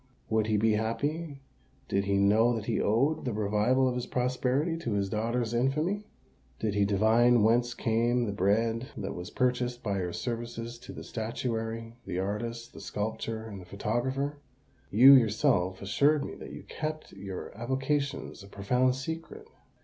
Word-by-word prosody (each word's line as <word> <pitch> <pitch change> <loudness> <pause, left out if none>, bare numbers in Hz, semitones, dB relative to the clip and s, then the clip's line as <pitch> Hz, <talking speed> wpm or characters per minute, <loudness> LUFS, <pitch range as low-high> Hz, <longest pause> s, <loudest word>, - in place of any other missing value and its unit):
"Would 110 -1 +2
he 110 -1 +2
be 110 +2 +3
happy 140 +7 -2 0.4
did 100 0 0
he 100 0 +1
know 110 +5 +4
that 110 -2 -4
he - - 0
owed 135 +9 +2
the 125 - -2
revival 105 +5 +2
of 125 - +1
his 125 -1 -3
prosperity 130 +5 0
to 120 -9 -3
his 100 -1 0
daughter's 115 +2 -1
infamy?" 155 - 0 0.5
"Did 105 +5 -1
he 100 0 +3
divine 110 +3 +4
whence 120 +2 +3
came 120 +2 +1
the 105 - -2
bread 110 +5 +1
that 100 -1 -4
was 90 +2 -7
purchased 125 -1 0
by 100 -3 -1
your 90 -1 -2
services 115 +1 -5
to - - -10
the - - -8
statuary, 115 0 -4
the 90 -2 -3
artist, 115 +5 -3
the - - -10
sculptor, 110 +1 -3
and 100 -4 -8
the - - -12
photographer? 130 +9 -2 0.5
You 130 +6 +9
yourself 110 -6 +3
assured 145 +9 +2
me - - -6
that - - -9
you - - -9
kept 155 0 -5
your 95 -1 -7
avocations 135 +3 -2
a 100 - -12
profound 125 +6 +1
secret." 165 - -6
115 Hz, 165 wpm, -29 LUFS, 105-130 Hz, 0.5 s, You